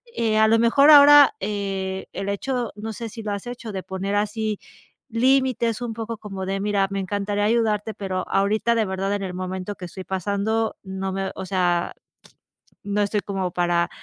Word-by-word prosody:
eh, 220 -2 +1
a 220 - +5
lo 225 +1 +4
mejor 235 +6 +5
ahora, 290 -1 +9
eh, 195 -2 -3
el 195 - -5
hecho 245 +4 -2
no 220 +1 -6
sé 230 +2 -6
si 225 +1 -8
lo 210 -1 -4
has 200 +2 -5
hecho 240 -2 -7
de 190 -2 -5
poner 190 +2 -3
así, 210 +1 -1 0.5
límites 245 -1 +1
un 235 -2 -3
poco 225 0 -5
como 195 -3 -6
de 195 +1 -1
"Mira, 200 -1 +1
me 195 - -3
encantaría 205 +2 -2
ayudarte, 220 -1 +1
pero 185 -2 -4
ahorita 215 +4 +1
de 225 -2 +1
verdad 195 +1 -2
en 205 - -2
el 185 -2 -5
momento 185 +2 -4
que 185 - -8
estoy 185 +2 -8
pasando 200 +4 -1
no 190 0 -4
me 195 0 -2
o - - -6
sea, 180 -2 0 0.9
no 205 0 -1
estoy 205 +1 0
como 190 -3 -3
para 175 -1 +1
205 Hz, 190 wpm, -23 LUFS, 190-225 Hz, 0.9 s, ahora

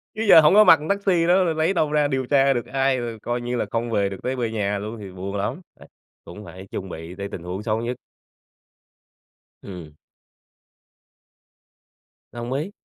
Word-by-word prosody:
Chứ 220 - -2
giờ 160 - +10
hổng 150 +4 +5
có 215 +1 +8
mặt 165 - +7
thằng 155 - -7
taxi 190 -4 +1
đó 185 +2 +4
rồi 165 -3 0
lấy 160 +4 +1
đâu 155 -4 0
ra 150 -1 +2
điều 130 -2 -2
tra 135 +1 +3
được 120 - -3
ai, 135 -1 0
rồi 115 -2 -5
coi 120 +2 -3
như 120 +1 -3
là - - -1
không 115 0 -2
về 100 -2 +1
được 95 - -7
tới 130 +1 -2
về 120 -3 -2
nhà 105 -2 -1
luôn 105 +3 -6
thì 100 -2 -9
buồn 95 +2 -6
lắm, 100 - -3 0.2
đấy, - - -15 0.4
cũng 105 +4 -11
phải 95 +3 -11
chuẩn 95 - -5
bị 80 +1 -8
tới 100 +1 -5
tình 85 - -7
huống 90 +3 -5
xấu 110 0 -1
nhất. 120 +1 -4 1.6
Ừm. 90 -6 -10 2.4
Đồng 120 +1 -5
ý. 155 +9 -3
120 Hz, 200 wpm, -23 LUFS, 100-150 Hz, 2.4 s, giờ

